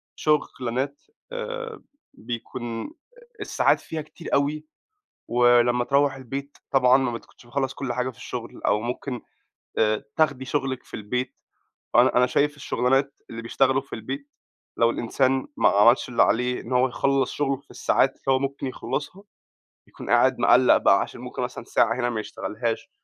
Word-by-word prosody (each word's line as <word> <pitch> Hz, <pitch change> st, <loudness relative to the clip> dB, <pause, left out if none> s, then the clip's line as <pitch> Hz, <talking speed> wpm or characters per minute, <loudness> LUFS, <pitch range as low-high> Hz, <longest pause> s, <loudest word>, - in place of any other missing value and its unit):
شُغلانات 135 Hz, -2 st, -1 dB, 0.3 s
آآ 485 Hz, -2 st, -5 dB, 0.3 s
بيكون 120 Hz, -, -6 dB, 0.5 s
الساعات 415 Hz, -, +2 dB
فيها 160 Hz, -1 st, -5 dB
كتير 155 Hz, +2 st, -9 dB
أوي 150 Hz, +2 st, +1 dB, 0.6 s
ولمّا 120 Hz, 0 st, +4 dB
تروّح 140 Hz, +1 st, +2 dB
البيت 135 Hz, +2 st, -7 dB
طبعًا 130 Hz, -1 st, +5 dB
ما 130 Hz, -3 st, 0 dB
بتكونش 115 Hz, +1 st, -11 dB
مخلَّص 135 Hz, +2 st, -2 dB
كل 130 Hz, -3 st, -3 dB
حاجة 125 Hz, +1 st, -1 dB
في 125 Hz, -, -12 dB
الشُغل 125 Hz, -2 st, -7 dB
أو 105 Hz, +1 st, +2 dB
ممكن 125 Hz, +1 st, -4 dB, 0.6 s
آآ 110 Hz, -1 st, +2 dB
تاخدي 140 Hz, -5 st, +2 dB
شُغلِك 130 Hz, -2 st, -2 dB
في -, -, -22 dB
البيت 125 Hz, +5 st, -3 dB, 0.6 s
وأنا -, -, +5 dB
أنا 125 Hz, -, +5 dB
شايف 145 Hz, +3 st, +1 dB
الشُغلانات 135 Hz, 0 st, 0 dB
اللي 115 Hz, 0 st, -6 dB
بيشتغلوا 135 Hz, +3 st, +2 dB
في 135 Hz, -, -14 dB
البيت 135 Hz, +6 st, -5 dB, 0.5 s
لو 115 Hz, -, +4 dB
الإنسان 130 Hz, +3 st, 0 dB
ما -, -, +5 dB
عملش 115 Hz, +6 st, +4 dB
اللي 120 Hz, -, +4 dB
عليه 125 Hz, +2 st, +1 dB
إن 120 Hz, -, -10 dB
هو 125 Hz, +1 st, +4 dB
يخلَّص 135 Hz, +1 st, +1 dB
شُغله 140 Hz, -2 st, 0 dB
في 140 Hz, -, -20 dB
الساعات -, -, +2 dB
اللي -, -, -32 dB
هو 130 Hz, -1 st, +4 dB
ممكن 140 Hz, 0 st, -3 dB
يخلَّصها، 145 Hz, +8 st, -5 dB, 0.7 s
يكون -, -, -9 dB
قاعد -, -, +4 dB
مقَلَّق -, -, +6 dB
بقى -, -, +4 dB
عشان -, -, -5 dB
ممكن -, -, -5 dB
مثلًا -, -, -5 dB
ساعة 115 Hz, -, +2 dB
هنا 120 Hz, 0 st, +1 dB
ما 110 Hz, -2 st, -2 dB
يشتغلهاش، 115 Hz, +2 st, -4 dB
130 Hz, 155 wpm, -25 LUFS, 120-140 Hz, 0.7 s, مقَلَّق